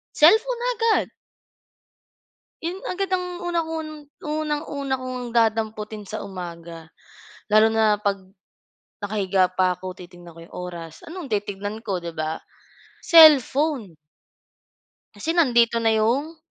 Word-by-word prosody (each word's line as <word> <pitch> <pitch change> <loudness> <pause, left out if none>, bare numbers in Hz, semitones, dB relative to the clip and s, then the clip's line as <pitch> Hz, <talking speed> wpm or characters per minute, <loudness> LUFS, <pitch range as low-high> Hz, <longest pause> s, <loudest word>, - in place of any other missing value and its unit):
Cellphone 455 +10 +4
agad. 455 -1 +1 1.5
Yon 340 +2 -2 0.2
agad 390 +2 -2
ang 360 -1 -5
unang-un 325 -2 -2 0.3
unang-una 295 -3 -3
ko - - -9
ngang 250 -1 -5
dadamputin 220 -2 0
sa 215 +2 -6
umaga 170 -3 -9 0.6
lalo 215 +1 +6
na 220 -1 +3
'pag 200 -2 0 0.8
nakahiga 195 -3 +1
pa 185 0 +1
ako 185 0 -8
titingnan 175 -1 -13
ko - - -13
'yong - - -21
oras 170 -3 -9
anong 350 0 -7
titingnan 205 +1 -3
ko 195 -3 -1
'di 170 -1 -6
ba? 155 0 -3 0.7
Cellphone. 290 - +5 1.2
Kasi 325 - -2
nandito 235 -8 +3
na 225 - +3
yung? 245 +9 0
225 Hz, 115 wpm, -23 LUFS, 190-310 Hz, 1.5 s, lalo